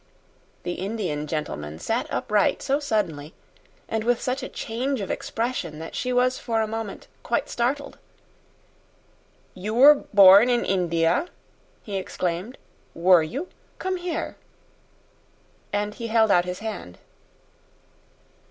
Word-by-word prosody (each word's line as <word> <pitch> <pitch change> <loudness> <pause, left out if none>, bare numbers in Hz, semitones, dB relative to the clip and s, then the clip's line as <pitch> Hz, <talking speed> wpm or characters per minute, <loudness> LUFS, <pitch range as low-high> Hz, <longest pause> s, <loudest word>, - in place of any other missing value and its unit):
The 175 - -2
Indian 185 -8 -3
gentleman 80 - -4
sat 85 - -2
upright 205 - +1
so 280 +1 +1
suddenly, 180 - -2 0.5
and 220 -1 -2
with 240 0 +2
such 255 +1 -2
a - - -6
change 250 +4 -3
of 195 - -3
expression, 225 -10 -3
that 165 +1 -8
she 250 - -2
was 250 +1 +2
for 230 -2 -1
a 220 - +2
moment 220 -2 -6
quite - - -1
startled. 270 +4 -2 1.5
"You 210 +4 -4
were 280 +5 +9 0.2
born 200 +3 +8
in 240 -1 +2
India," 175 - +1 0.6
he 200 -2 -4
exclaimed, 185 +4 -3 0.4
"were 175 0 +5
you? 270 - -4 0.3
Come 375 0 -2
here." 355 -1 -4 1.3
And 205 +1 -1
he 230 0 -6
held 220 -2 +3
out 175 -1 +4
his 180 0 -4
hand. 145 - -6
210 Hz, 125 wpm, -24 LUFS, 175-245 Hz, 1.5 s, were